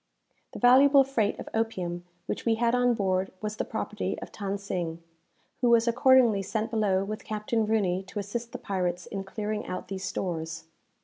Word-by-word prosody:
The - - -6
valuable 270 +3 +7
freight 230 -6 0
of - - -8
opium 180 -6 -2 0.2
which - - -4
we 230 -1 +2
had 235 +1 +1
on 245 -1 +3
board 190 -3 0
was 215 +1 -4
the - - 0
property 210 -3 -3
of - - -9
Than 200 -1 -3
Sing, 175 -4 -4 0.6
who 245 - +4
was 235 0 +5
accordingly 245 -3 +5
sent 220 +3 -2
below 200 -4 +2
with 215 +2 -5
Captain 215 +1 -1
Rooney 195 -4 +1
to 210 - -9
assist 230 +4 -4
the - - -5
pirates 180 -3 -2
in 195 -1 -5
clearing 210 +2 -3
out 185 - -5
these 190 -1 -5
stores. 165 -3 -3
210 Hz, 180 wpm, -28 LUFS, 190-230 Hz, 0.6 s, valuable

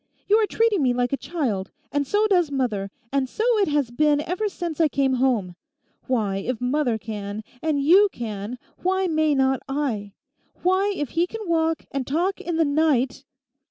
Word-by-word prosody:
You 420 - +5
are 430 - +2
treating 450 -6 +2
me 255 -3 +3
like 245 +1 0
a - - +4
child; 265 - -2 0.2
and 285 -1 0
so 415 +7 +2
does 360 -7 +3
mother, 235 -8 -1 0.2
and 270 -2 +1
so 435 - -3 0.2
it 400 - +3
has 290 -5 0
been 295 +3 +3
ever 370 +7 -2
since 340 -4 -3
I 320 - +5
came 275 -2 +1
home. 215 -9 +1 0.5
Why, 215 -6 0
if 225 +4 -3
mother 250 -2 +1
can, 210 -1 -6 0.2
and 310 -3 0
you 370 +9 +6
can, 220 0 -5 0.2
why 380 +1 +1
may 310 -3 +2
not 265 -1 +2
I? 240 -8 -2 0.5
Why, 375 +3 +3
if 290 -4 -2
he 340 +2 +1
can 440 0 -7
walk 325 -1 +1
and 275 -2 -3
talk 350 +7 0
in 345 - -3
the 325 0 +3
night.... 285 -3 +1
285 Hz, 185 wpm, -24 LUFS, 245-340 Hz, 0.5 s, you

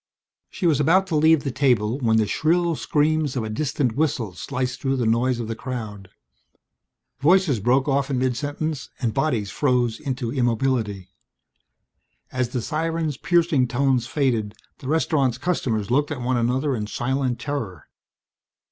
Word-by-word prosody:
She 185 - -5
was 155 -4 +3
about 180 +6 +4
to 170 - -1
leave 155 0 +4
the 140 - -2
table 125 -3 +1
when 110 -4 +2
the 110 - +3
shrill 170 - +1
screams 150 -1 0
of 125 - -1
a 110 - -4
distant 135 -1 -1
whistle 125 -9 -1
sliced 130 +6 -4
through 135 0 0
the 125 -3 -1
noise 120 +2 +1
of 115 - -4
the 115 - -2
crowd. 110 -7 -6 1.1
Voices 165 - +3
broke 130 +6 +2
off 140 0 +1
in 135 - 0
mid 125 -1 0
sentence 145 +1 -3
and 115 -4 -1
bodies 125 -9 0
froze 125 -5 +1
into 125 -4 -3
immobility. 115 -6 -1 1.2
As 125 -2 -1
the 125 -2 -3
siren's 160 0 -2
piercing 165 -7 +2
tones 125 -1 +1
faded 120 -8 0 0.2
the 130 - -9
restaurant's 140 -5 +1
customers 125 - -1
looked 145 +3 +2
at 145 -5 -4
one 125 +1 0
another 125 +4 0
in 105 -2 -3
silent 130 +2 -1
terror. 110 - -5
130 Hz, 155 wpm, -23 LUFS, 120-150 Hz, 1.2 s, about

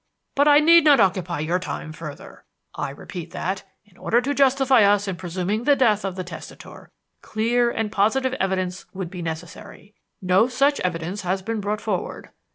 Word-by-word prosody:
"But 285 +1 +3
I 290 0 +7
need 335 +2 +6
not 290 -4 +6
occupy 180 -5 +1
your 170 +4 0
time 155 -3 -6
further. 155 -2 -10 0.3
I - - -4
repeat 165 +4 -8
that, 190 +1 -3 0.2
in 195 -4 -26
order 235 - +1
to 270 +4 -1
justify 270 -2 +4
us 205 0 +3
in 190 - -2
presuming 185 +5 -3
the 290 - +5
death 215 -6 +2
of 195 -2 -3
the 185 - -4
testator, 165 -3 -11 0.3
clear 235 +2 +1
and 225 -3 -3
positive 255 +6 +1
evidence 185 -1 -2
would 185 -3 -5
be 180 - -7
necessary. 165 +5 -8 0.3
That - - -6
no 190 +6 +4
such 275 +3 +1
evidence 180 +3 -3
has 190 0 -2
been 225 +1 -3
brought 210 +1 -2
forward. 195 -5 -4
200 Hz, 180 wpm, -23 LUFS, 180-240 Hz, 0.3 s, I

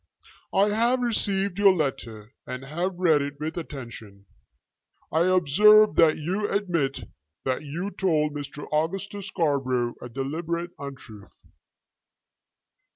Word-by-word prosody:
"I 200 +2 +3
have 235 +4 +2
received 200 -4 0
your 200 -2 +6
letter 120 - -4
and 125 +1 -6
have 175 +6 -3
read 165 -5 +3
it 140 0 -5
with 155 +1 -4
attention. 115 - -8 0.9
I 160 +2 +2
observe 205 +5 +6
that 160 -2 +5
you 190 +7 -2
admit 170 -10 -1 0.4
that 130 0 -1
you 165 +7 -5
told 155 -7 0
Mr. 145 0 -7
Augustus 195 +6 -2
Scarborough 130 -7 0
a 125 - -7
deliberate 165 +7 -3
untruth. 125 -7 -11
160 Hz, 115 wpm, -25 LUFS, 135-190 Hz, 0.9 s, your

